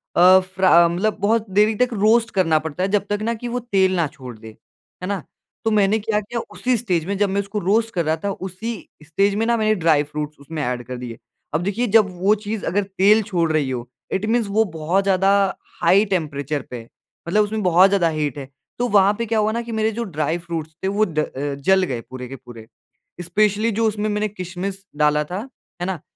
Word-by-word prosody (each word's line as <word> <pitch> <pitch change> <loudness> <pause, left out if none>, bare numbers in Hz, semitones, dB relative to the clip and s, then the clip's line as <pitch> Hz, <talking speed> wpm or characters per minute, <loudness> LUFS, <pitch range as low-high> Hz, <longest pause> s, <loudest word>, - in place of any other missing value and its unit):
अ, 185 +2 +7
फर्रा 185 -2 +4
मतलब 195 +6 -1
बहुत 220 +1 +1
देरी 210 +3 +3
तक 250 +3 +2
रोस्ट 225 +3 +3
करना 165 -5 +3
पड़ता 160 +3 -4
है, 195 - 0
जब 200 0 +1
तक 205 0 -1
ना 230 +2 0
कि 240 +2 -6
वो 245 +1 -2
तेल 190 -5 +1
ना 170 -3 +1
छोड़ 130 -6 -11
दे, 110 - -12 0.6
है 180 - -3
ना? 200 -4 -3 0.4
तो 225 - +2
मैंने 210 0 +3
क्या 210 0 0
किया 230 +3 -5
उसी 255 0 0
स्टेज 180 -8 -1
में, 200 +2 -2
जब 205 0 +2
मैं 200 +1 0
उसको 200 +1 -4
रोस्ट 220 +5 +1
कर 170 -3 -1
रहा 155 +1 +1
था, 200 - 0
उसी 190 +4 -6 0.2
स्टेज 195 +6 +1
में 225 +2 0
मैंने 220 -2 +2
ड्राई 160 -5 +3
फ्रूट्स 150 0 -6
उसमें 150 +1 -5
एड 125 0 -2
कर 125 -1 -5
दिए। 120 -2 -7 0.4
अब 155 +3 0
देखिए 210 +6 -1
जब 215 -1 +5
वो 205 +3 +4
चीज़ 215 0 -5
अगर 200 +4 0
तेल 200 +3 +3
छोड़ 170 -5 0
रही 150 -4 +1
हो, 125 -1 -4 0.2
इट 195 +2 -1
मीन्स 225 -1 +1
वो 220 +2 +3
बहुत 170 +5 0
ज़्यादा 195 0 +3 0.5
हाई 200 +3 +5
टेंपरेचर 150 -6 -2
पे - - -6
है, 115 -1 -12 0.4
मतलब 210 +5 +3
उसमें 215 +1 -3
बहुत 180 +1 +5
ज़्यादा 195 -4 +2
हीट 150 -3 -2
है, 135 -1 -7 0.3
तो 245 - +1
वहाँ 200 -1 +4
पे 235 - -1
क्या 225 0 0
हुआ 215 0 +1
ना 235 +2 -2
कि 235 0 -8
मेरे 220 0 0
जो - - 0
ड्राई 160 -4 -2
फ्रूट्स 165 -2 -6
थे - - 0
वो 205 +2 +2
ड 155 -6 -3
अ, 140 -1 -3
जल 190 +7 +2
गए 125 -9 -3
पूरे 130 -1 -7
के 135 - -8
पूरे, 115 -3 -13 0.6
स्पेशली 210 +5 +1
जो 225 +2 0
उसमें 215 0 -2
मैंने 210 +1 0
किशमिश 190 0 -6
डाला 150 0 +2
था, 195 - -6 0.3
है 175 - -2
ना, 185 -5 -3
190 Hz, 225 wpm, -21 LUFS, 160-215 Hz, 0.6 s, अ